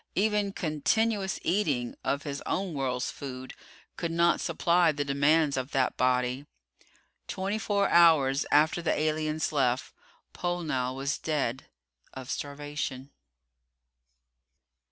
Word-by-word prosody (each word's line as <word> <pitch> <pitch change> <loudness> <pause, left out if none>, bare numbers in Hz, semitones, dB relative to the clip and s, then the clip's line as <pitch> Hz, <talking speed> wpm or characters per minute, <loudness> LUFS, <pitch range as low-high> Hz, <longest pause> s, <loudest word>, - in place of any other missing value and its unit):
Even 210 0 +1
continuous 190 +5 0
eating 150 -10 0
of 140 +1 -1
his 140 -2 -5
own 190 -2 -1
world's 130 -3 -2
food 130 -2 -8 0.4
could 170 - -2
not 170 +1 +2
supply 170 -1 +2
the 145 -1 -3
demands 140 +2 +2
of 130 +2 -4
that 130 -2 +1
body. 125 +2 0 0.8
Twenty 195 +3 -2
four 200 -2 +1
hours 155 -6 +5
after 155 +4 +4
the 165 - 0
aliens 155 0 -1
left, 130 -4 0 0.4
Pollnow 155 -8 -2
was 140 +1 -2
dead 135 -5 -2 0.5
of 130 -1 -6
starvation. 145 -2 -5
150 Hz, 115 wpm, -28 LUFS, 135-170 Hz, 0.8 s, hours